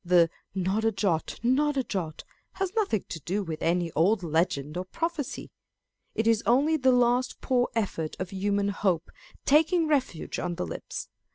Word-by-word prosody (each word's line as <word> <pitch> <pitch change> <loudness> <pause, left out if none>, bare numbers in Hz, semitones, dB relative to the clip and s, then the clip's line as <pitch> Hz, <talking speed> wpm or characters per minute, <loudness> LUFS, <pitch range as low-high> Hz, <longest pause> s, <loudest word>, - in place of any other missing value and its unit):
The 175 -2 +4
" - - -52
Not 190 +3 0
a 225 - +3
jot, 190 -6 -1
not 280 +4 +2
a 265 - +2
jot," 170 -9 -4 0.3
has 385 -1 -2
nothing 390 - +1
to 165 - -5
do 195 +7 -2
with 160 -4 -5
any 170 0 +1
old 190 +6 +2
legend 155 -3 0
or 180 - -2
prophecy. 325 - -3 0.6
It 220 - 0
is 225 -2 +4
only 280 +7 +4
the 260 -4 +4
last 245 0 +2
poor 245 -1 +1
effort 175 -8 -2
of 185 -1 -5
human 200 +1 0
hope, 185 -4 0 0.3
taking 320 +3 +4
refuge 270 - -1
on 175 -1 -2
the 90 - -2
lips. 85 - -6
205 Hz, 175 wpm, -28 LUFS, 175-260 Hz, 0.6 s, The